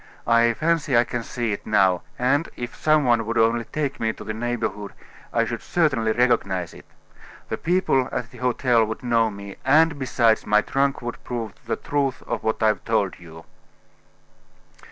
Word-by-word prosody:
I 115 0 +4
fancy 155 -4 +1
I 120 - +6
can 120 -1 -4
see 115 0 -3
it 100 - -4
now; 95 -4 +3 0.2
and, 140 +6 +1
if 120 -1 -6
some 155 -2 +2
one 120 -2 +3
would 115 +2 -3
only 115 +1 +2
take 145 -3 -3
me 110 -1 0
to - - -10
the 110 - -4
neighborhood, 110 -3 -3 0.4
I - - +2
should - - -4
certainly 140 -10 +1
recognize 100 -7 +1
it. - - -15 0.6
The - - -2
people 170 -7 +1
at 120 +2 -4
the 125 - -13
hotel 125 -2 +2
would 110 +2 -5
know 115 -2 +2
me, 100 -1 -9
and, 150 +2 +4
besides, 120 -4 +2
my 105 0 +4
trunk 140 -1 0
would 120 0 -6
prove 115 -3 -4 0.2
the - - 0
truth 140 -3 -2
of - - -3
what 110 0 -1
I've 110 -1 +2
told 105 -4 0
you." 80 -1 -13
120 Hz, 175 wpm, -23 LUFS, 110-130 Hz, 0.6 s, I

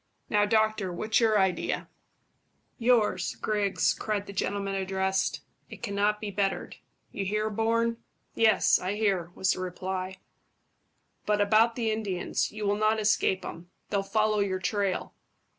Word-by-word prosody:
Now, 205 -1 +3
doctor, 215 -3 +1
what's 215 +5 +1
your 220 -2 +3
idea?" 190 -2 0 0.9
"Yours, 225 -6 +2
Griggs," 205 -2 +1
cried 210 -2 -2
the 200 - -9
gentleman 200 +1 -2
addressed. 190 0 -1 0.3
"It - - -11
cannot 205 0 +1
be 210 -1 -4
bettered. 195 0 -2 0.3
You 200 - -3
hear, 210 +2 -1
Bourne?" 230 +2 +1 0.4
"Yes, 220 -2 +4
I 185 +3 -2
hear," 195 -5 0
was 190 0 +2
the - - -2
reply; 185 +1 -4 1.1
"but 210 0 +2
about 220 +3 +4
the 230 -3 0
Indians. 205 -5 -2
You 215 0 -5
will 205 0 +1
not 215 +1 +2
escape 210 -3 +2
them; 170 +1 -8 0.2
they'll 200 - +1
follow 215 +1 +1
your 195 -2 0
trail." 195 -1 -1
205 Hz, 140 wpm, -28 LUFS, 190-215 Hz, 1.1 s, Yes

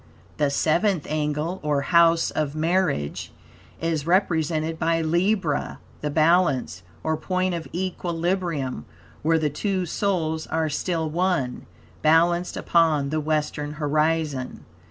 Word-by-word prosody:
The 145 -2 +2
seventh 165 +4 +1
angle, 155 +3 -2
or 150 -2 0
House 170 +2 +4
of 150 -1 -2
Marriage, 160 - 0 0.5
etc., 165 0 0
is 155 -1 -3
represented 160 -3 +1
by 165 0 +1
Libra 170 0 0 0.2
(the 150 - -1
Balance), 155 - +2 0.2
or 160 0 0
point 185 +2 -1
of 170 -1 -4
equilibrium; 170 - -2 0.4
where 165 +1 +3
the 155 -2 0
two 185 +4 -1
souls 160 -4 -1
are 160 -1 0
still 165 +1 -1
one, 165 -6 -1 0.3
balanced 170 +3 +3
upon 155 -5 +2
the 155 - 0
western 150 -1 -2
horizon. 150 -2 -1
160 Hz, 120 wpm, -24 LUFS, 150-175 Hz, 0.5 s, House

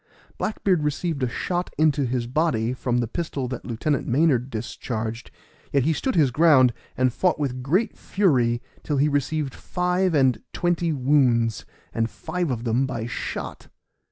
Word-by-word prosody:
Black 215 - -3
beard 185 -5 +3
received 150 +1 -2
a 125 - +1
shot 175 +8 -2
into 150 -3 +3
his 120 -1 -1
body 125 -4 0
from 125 -1 -1
the 120 -1 0
pistol 140 -1 -3
that 125 -2 -5
Lieutenant 125 +4 -1
Maynard 130 -2 +2
discharged, 115 0 -4 0.4
yet 140 -2 +3
he 160 +4 +2
stood 260 - -1
his 145 -6 +4
ground, 130 -4 +5 0.2
and 130 -1 +2
fought 180 +4 +1
with 130 -4 -2
great 185 - +1
fury 125 -11 +1 0.2
till 150 - -2
he 145 +2 +3
received 145 -1 -1
five 180 0 0
and 130 -4 +3
twenty 175 -1 0
wounds, 125 -5 +2 0.3
and 115 0 0
five 180 +5 -3
of 120 -3 -2
them 125 +3 +1
by 115 -3 -4
shot. 120 - -5
135 Hz, 160 wpm, -24 LUFS, 120-160 Hz, 0.4 s, ground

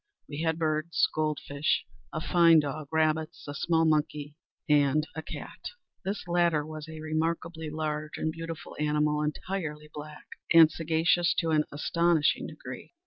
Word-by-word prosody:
We 145 +1 -5
had 160 -1 +1
birds, 155 0 +1
gold 155 -1 0
fish, 145 +2 0 0.3
a - - -3
fine 165 0 +5
dog, 150 +1 -5
rabbits, 160 0 0
a 145 - -4
small 165 +3 +2
monkey, 150 -1 0 0.3
and 150 0 +3
a 160 - -3
cat. - - -8 0.4
This 195 -1 -4
latter 170 -3 +2
was 155 0 -8
a 160 0 -8
remarkably 160 +1 -2
large 155 0 -3
and 160 - -1
beautiful 165 0 -7
animal, 150 0 +1
entirely 150 -1 -4
black, 150 0 -9 0.3
and 165 -1 +8
sagacious 165 +2 +2
to 165 -2 0
an 150 -1 +3
astonishing 170 +1 +2
degree. - - -9
155 Hz, 145 wpm, -29 LUFS, 150-165 Hz, 0.4 s, and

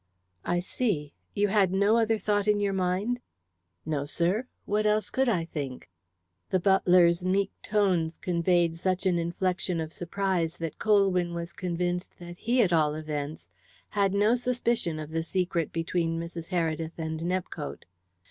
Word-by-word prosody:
"I 175 0 +1
see. 175 - -2 0.2
You 205 0 +2
had 195 -3 +3
no 200 +3 +3
other 225 -1 +3
thought 205 0 0
in 210 -1 +3
your 200 -1 0
mind?" 190 +6 0 0.7
"No, 145 -2 -2
sir. 180 - 0 0.2
What 210 +1 +1
else 210 0 +1
could 265 -1 +2
I 175 -7 +1
think?" 135 - -6 0.6
The 185 - +2
butler's 180 -2 +4
meek 195 +2 +1
tones 185 -6 +1
conveyed 170 -1 +1
such 185 +2 -1
an 180 -2 +3
inflection 180 +1 -1
of 160 0 -4
surprise 175 -2 -1
that 165 -2 -5
Colwyn 190 -5 +3
was 170 -1 -5
convinced 180 0 -2
that 175 0 -10
he, 240 +1 +3
at 180 -4 +1
all 150 -2 +3
events, 155 -1 -5 0.4
had 200 -1 +1
no 210 +3 +4
suspicion 240 -8 0
of 155 0 -6
the 165 0 0
secret 175 -1 -1
between 165 0 -1
Mrs. 170 0 -6
Heredith 165 -2 -1
and 160 -1 -3
Nepcote. 175 -3 -3
180 Hz, 155 wpm, -28 LUFS, 165-200 Hz, 0.7 s, butler's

